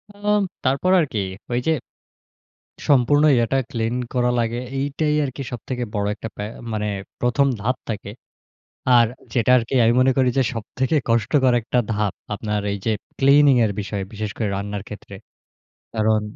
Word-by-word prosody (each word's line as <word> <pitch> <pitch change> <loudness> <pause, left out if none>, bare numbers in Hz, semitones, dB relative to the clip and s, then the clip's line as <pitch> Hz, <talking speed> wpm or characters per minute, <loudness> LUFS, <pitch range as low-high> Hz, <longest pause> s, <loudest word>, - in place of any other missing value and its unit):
উ - - -18 0.5
তারপর 140 +8 +2
আর 165 - +3
কি? 110 - 0 0.3
ওইযে, 125 +6 +1 1.2
সম্পূর্ণ 145 +2 +4
ইয়াটা 120 +2 +1
ক্লিন 115 0 -1 0.2
করা 125 -1 +2
লাগে। 115 0 0 0.2
এইটাই 145 +2 0
আরকি 135 0 -5
সবথেকে 125 +1 -4
বড় 100 -1 0
একটা 115 - -7
পে - - -5 0.3
মানে 105 -1 -1 0.3
১ম 125 +3 +2
ধাপ 125 +5 0
থাকে। 105 -2 -4 0.9
আর 120 -1 +7 0.3
যেটা 120 0 +2
আরকি 115 0 -3
আমি 115 +1 +4
মনে 130 +1 +4
করি 130 -1 +4
যে, - - +5
সবথেকে 130 +6 -2
কষ্টকর 120 +3 +3
একটা 120 +2 0
ধাপ, 105 -2 0 0.2
আপনার 105 0 -2
এইযে 100 +3 -2 0.3
ক্লিনিংয়ের 135 -5 +5
বিষয়ে, 100 -1 -3
বিশেষ 105 0 -4
করে 110 -3 -1
রান্নার 100 0 -4
ক্ষেত্রে। 100 -1 -9 0.8
কারণ 110 -1 +2
120 Hz, 145 wpm, -22 LUFS, 105-130 Hz, 1.2 s, আর